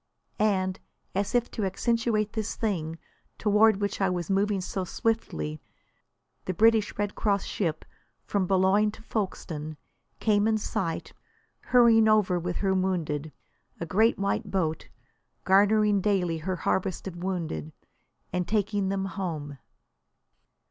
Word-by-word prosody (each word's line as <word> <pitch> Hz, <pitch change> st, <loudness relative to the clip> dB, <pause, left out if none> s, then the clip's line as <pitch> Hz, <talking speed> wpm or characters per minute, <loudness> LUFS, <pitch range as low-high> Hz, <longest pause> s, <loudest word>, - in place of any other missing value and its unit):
And 190 Hz, -3 st, +1 dB, 0.3 s
as 200 Hz, +4 st, -1 dB
if 240 Hz, 0 st, +1 dB
to 220 Hz, -, -3 dB
accentuate 215 Hz, +1 st, 0 dB
this 220 Hz, -2 st, -3 dB
thing 165 Hz, -7 st, -2 dB, 0.4 s
toward 210 Hz, 0 st, +4 dB
which 200 Hz, 0 st, -2 dB
I 195 Hz, -, +3 dB
was 175 Hz, -1 st, -2 dB
moving 200 Hz, +1 st, +1 dB
so 185 Hz, +1 st, -3 dB
swiftly, 80 Hz, -, -2 dB, 0.8 s
the 185 Hz, -, -2 dB
British 225 Hz, +1 st, +3 dB
Red 205 Hz, 0 st, -1 dB
Cross 200 Hz, -3 st, 0 dB
ship, 165 Hz, -6 st, -2 dB, 0.4 s
from 195 Hz, -3 st, -1 dB
Boulogne 195 Hz, +3 st, +3 dB
to 220 Hz, -, -13 dB
Folkstone, 160 Hz, -8 st, -4 dB, 0.4 s
came 210 Hz, -1 st, +3 dB
in 220 Hz, -1 st, +2 dB
sight, 170 Hz, -5 st, -3 dB, 0.5 s
hurrying 230 Hz, -3 st, +5 dB
over 210 Hz, -5 st, +3 dB
with 175 Hz, +1 st, -3 dB
her 190 Hz, -, +3 dB
wounded, 165 Hz, -6 st, -1 dB, 0.5 s
a 170 Hz, -, -3 dB
great 220 Hz, +7 st, +3 dB
white 200 Hz, 0 st, -1 dB
boat, 160 Hz, -5 st, -1 dB, 0.5 s
garnering 205 Hz, +1 st, +4 dB
daily 180 Hz, -5 st, +1 dB
her 185 Hz, +4 st, -2 dB
harvest 185 Hz, +1 st, -1 dB
of 175 Hz, -2 st, -6 dB
wounded 170 Hz, -, -3 dB, 0.6 s
and 180 Hz, -1 st, -1 dB
taking 205 Hz, -2 st, 0 dB
them 195 Hz, 0 st, -1 dB
"home." 160 Hz, -8 st, -5 dB
195 Hz, 130 wpm, -27 LUFS, 175-210 Hz, 0.8 s, hurrying